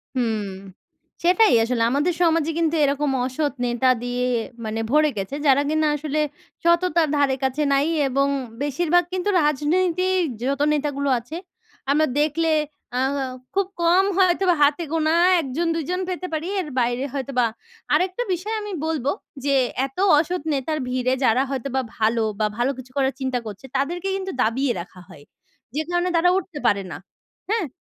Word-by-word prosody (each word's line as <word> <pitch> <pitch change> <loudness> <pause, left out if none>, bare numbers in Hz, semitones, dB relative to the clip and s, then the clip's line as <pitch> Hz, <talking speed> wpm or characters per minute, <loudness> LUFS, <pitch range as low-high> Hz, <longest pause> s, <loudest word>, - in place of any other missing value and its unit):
হুম। 225 -4 0 0.8
সেটাই 380 +5 +5
আসলে 230 0 0
আমাদের 295 +7 +1
সমাজে 330 -2 +2
কিন্তু 330 -1 +1
এরকম 285 0 +1
অসৎ 285 +2 -1
নেতা 240 +1 +1
দিয়ে, 245 0 -1 0.4
মানে 220 +1 -3
ভরে 305 +1 +4
গেছে, 195 +8 -3
যারা 275 +1 +5
কিনা 310 0 +2
আসলে 300 +1 -2 0.4
সততার 340 -1 +3
ধারে 275 -2 +2
কাছে 265 +3 0
নাই 280 +3 +2 0.2
এবং 275 +2 +1 0.3
বেশিরভাগ 340 +5 +2
কিন্তু 370 +2 -1
রাজনীতির 355 +5 +1 0.2
যত 280 +2 -1
নেতাগুলো 285 -1 -1
আছে, 245 +8 -9 0.6
আমরা 310 +2 +4
দেখলে 315 +2 +1 0.5
আ - - +1 0.6
খুব 395 -1 +2
কম 355 +3 +4
হয়তোবা 365 -1 +3
হাতে 290 +4 +3
গোনা 320 -1 +1 0.3
১ 300 - -3
জন, 340 +1 0
২ 325 - -1
জন 365 +1 -1
পেতে 365 0 -3
পারি, 315 +3 -2
এর 325 - -7
বাইরে 245 +1 0
হয়তো 275 -1 -4
বা, 240 - +4 0.5
আরেকটা 370 +6 +1
বিষয় 405 +6 -3
আমি 415 -1 -6
বলব 310 -5 -2 0.4
যে, 280 - +2 0.3
এত 270 +3 -11 0.2
অসৎ 345 +3 0
নেতার 295 +3 -1
ভিড়ে, 255 0 0
যারা 245 +2 +4
হয়তো 270 -1 -3
বা 265 - +2 0.2
ভালো 225 +1 +2 0.2
বা 215 - +2
ভালো 245 +3 +1
কিছু 255 0 -11
করার 270 0 +2
চিন্তা 260 -2 -1
করছে, 210 +3 -8
তাদেরকে 345 +7 -2
কিন্তু 385 0 -4
দাবিয়ে 245 +4 +1
রাখা 180 +1 -13
হয়। 145 - -14 0.5
যে 310 - +1
কারণে 350 +1 +1
তারা 335 +2 +4
উঠতে 345 -5 -5
পারে 200 -3 +2
না। - - -5 0.5
হ্যাঁ? 430 -6 0
295 Hz, 165 wpm, -23 LUFS, 260-340 Hz, 0.8 s, সেটাই